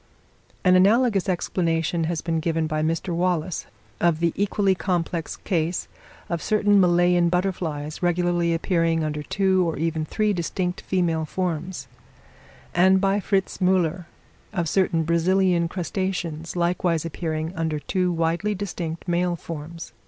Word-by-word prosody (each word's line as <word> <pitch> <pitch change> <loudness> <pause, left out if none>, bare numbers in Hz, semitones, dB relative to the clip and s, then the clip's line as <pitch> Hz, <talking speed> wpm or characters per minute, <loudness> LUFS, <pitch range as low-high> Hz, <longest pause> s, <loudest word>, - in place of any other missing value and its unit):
An 185 0 +5
analogous 205 +1 +4
explanation 165 -2 0
has 165 -1 -2
been 165 -1 -1
given 160 0 0
by 155 0 -1
Mr. 165 +3 -1
Wallace, 175 -1 -1 0.3
of 170 -2 +2
the 170 -1 +1
equally 200 0 +2
complex 175 -3 -2
case, 170 -2 -1 0.4
of 170 -2 -2
certain 205 +1 +3
Malayan 175 -1 +4
butterflies 170 -5 -2
regularly 175 -1 +1
appearing 165 -1 +1
under 150 -1 -2
two 190 +4 +2
or 160 - -4
even 160 0 -1
three 210 +6 0
distinct 180 +1 -2
female 170 -4 0
forms; 175 -4 -3 0.9
and 190 +2 +5
by 195 +1 +2
Fritz 195 -1 -1
Müller, 180 -2 +1 0.5
of 175 -6 -1
certain 165 -2 +2
Brazilian 170 +1 +2
crustaceans 175 -2 -3
likewise 170 -2 0
appearing 160 0 -3
under 160 -2 -1
two 180 +4 0
widely 170 +5 0
distinct 175 -4 -5
male 175 0 +1
forms. 165 -3 -8
175 Hz, 130 wpm, -24 LUFS, 165-185 Hz, 0.9 s, An